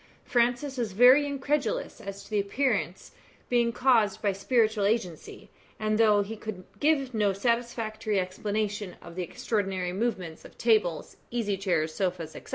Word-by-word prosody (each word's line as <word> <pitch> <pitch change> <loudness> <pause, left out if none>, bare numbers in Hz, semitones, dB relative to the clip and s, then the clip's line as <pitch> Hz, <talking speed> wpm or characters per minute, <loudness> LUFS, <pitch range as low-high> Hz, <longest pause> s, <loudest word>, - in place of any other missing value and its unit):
Francis 245 +3 +1
was 225 -5 -2
very 255 +7 +7
incredulous 290 - -2
as 200 0 -7
to - - -17
the 210 - +2
appearances 200 -3 -1 0.4
being 235 -1 +2
caused 230 -5 +3
by 205 -2 +1
spiritual 215 +1 +1
agency, 200 -6 -2 0.3
and 215 0 0
though 210 -2 +5
he 215 +3 -6
could 210 -4 -7 0.2
give 285 -4 +2
no 210 -3 +2
satisfactory 220 -1 -1
explanation 205 +1 -3
of 170 - -12
the 180 - -4
extraordinary 190 0 -2
movements 190 -6 -3
of - - -14
tables, 215 -8 +1
easy 225 -4 -1
chairs, 175 -5 0
sofas, 180 -4 -2
&c. - - -10
215 Hz, 150 wpm, -28 LUFS, 195-240 Hz, 0.4 s, very